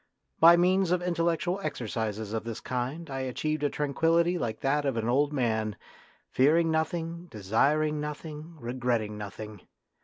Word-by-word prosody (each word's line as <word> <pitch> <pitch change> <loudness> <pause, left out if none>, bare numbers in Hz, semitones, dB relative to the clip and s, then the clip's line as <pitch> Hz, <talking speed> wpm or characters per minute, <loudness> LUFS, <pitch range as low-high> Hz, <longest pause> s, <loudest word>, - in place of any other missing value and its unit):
By 170 +1 +8
means 185 +1 +3
of 180 0 +1
intellectual 170 +1 0
exercises 110 - -3
of 110 - -2
this 115 0 -5
kind 130 +7 -3
I 135 -2 -4
achieved 145 +4 -2
a 145 - +2
tranquillity 165 +5 +2
like 110 -5 -3
that 145 +2 +1
of 135 -4 -1
an 115 0 -1
old 140 +4 +2
man, 110 -6 0 0.6
fearing 160 +5 +4
nothing, 165 +2 -2
desiring 140 +8 +1
nothing, 150 +2 -7
regretting 120 -4 -1
nothing. 105 0 -8
145 Hz, 145 wpm, -28 LUFS, 115-165 Hz, 0.6 s, By